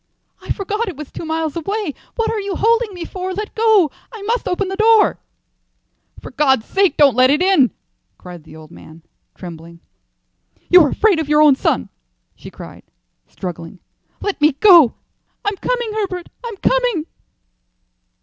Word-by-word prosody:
"I - - -14
forgot 420 +4 -2
it 360 -7 -6
was 300 -2 -9
two - - -8
miles 320 -1 -3
away. 390 0 -3 0.2
What 455 - -1
are 445 - -2
you 400 -2 -4
holding 460 0 +1
me 355 -3 -7
for? 370 +1 -5
Let 420 +1 -5
go. 435 -9 +3 0.2
I 445 -4 -10
must 465 +4 -2
open 370 +2 -1
the 385 - -4
door." 440 0 +3 1.0
"For - - -11
God's 265 -6 +1
sake 385 -6 +1
don't 285 -3 +5
let 255 +1 +4
it 295 +2 +2
in," 365 -9 +3 0.5
cried 175 -3 -12
the 155 0 -15
old 155 0 -14
man, 160 -1 -15 0.3
trembling. 170 -1 -11 0.9
"You're 350 -5 +6
afraid 405 -1 +2
of 310 -2 -4
your 300 0 +5
own 295 -3 +6
son," 90 - -1 0.5
she - - -12
cried, - - -12 0.5
struggling. 175 0 -8 0.4
"Let 400 -6 -3
me 300 0 +4
go. 325 - +6 0.5
I'm 410 0 -1
coming, 480 -2 -2
Herbert; 380 -5 -4
I'm 460 -4 -7
coming." - - 0
360 Hz, 160 wpm, -18 LUFS, 275-420 Hz, 1.0 s, You're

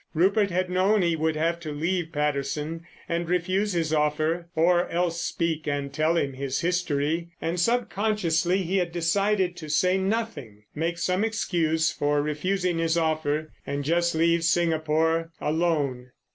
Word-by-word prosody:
Rupert 200 +5 +3
had 185 +1 0
known 190 +2 +3
he 170 -1 +2
would 160 0 0
have 165 +2 0
to 155 -3 -6
leave 165 +3 -2
Patterson 150 +2 -2 0.2
and 170 0 -2
refuse 185 +3 0
his 165 -2 0
offer—or 165 +3 +1
else 170 0 -1
speak 165 -3 -2
and 140 -1 -2
tell 155 +3 +1
him 140 -4 0
his 135 0 -3
history, 170 -2 0
and, 170 +2 -2
sub 240 +7 +2
consciously, 190 -3 +1
he 185 +3 0
had 175 -2 0
decided 185 +2 +1
to 155 -2 -8
say 180 +5 +2
nothing, 190 - -3
make 165 +2 -2
some 180 +3 0
excuse 165 -8 +1
for 145 0 0
refusing 175 +4 -1
his 165 0 +1
offer 155 -1 0 0.2
and 140 0 -2
just 170 +3 +1
leave 170 +1 +2
Singapore, 165 -1 +1
alone. 150 -6 0
165 Hz, 150 wpm, -26 LUFS, 155-180 Hz, 0.2 s, Rupert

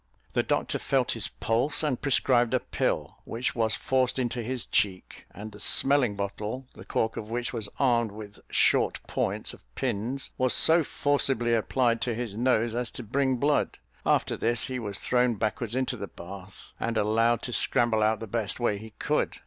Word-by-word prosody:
The - - +3
doctor - - -1
felt - - +1
his - - 0
pulse, 120 +8 -1
and 140 -5 -1
prescribed 130 -3 +2
a - - +3
pill, - - -2
which 120 +2 -3
was 110 -2 +1
forced 130 -1 +1
into 125 -1 -1
his 125 +1 -2
cheek; 100 -4 -1
and 105 +3 -9
the 105 - -13
smelling 130 +1 +5
bottle, 105 +5 -4
the - - -12
cork 110 0 -1
of 110 - -6
which 120 -1 -2
was 110 -4 -3
armed 120 -5 +2
with 105 0 -10
short - - +3
points - - -2
of - - -14
pins, 125 +7 -2
was 130 -1 +4
so 165 +1 +6
forcibly 135 -5 +1
applied 115 +2 +1
to 120 -2 -1
his 115 -3 -4
nose 120 -1 +1
as 120 -1 -1
to 125 - -8
bring 130 +4 0
blood; 145 +4 +1 0.3
after - - +1
this, 120 0 +3
he 130 -1 -3
was 100 -4 -3
thrown 125 0 +1
backwards 110 +2 -2
into 130 0 -1
the 100 -4 -6
bath, 95 +2 -10
and 115 -1 -2
allowed 115 +3 +2
to 125 - -4
scramble 115 -2 +3
out 110 0 +2
the 115 - -5
best 110 0 -2
way 105 -4 0
he 110 0 -11
could. - - -1
115 Hz, 185 wpm, -27 LUFS, 110-125 Hz, 0.3 s, so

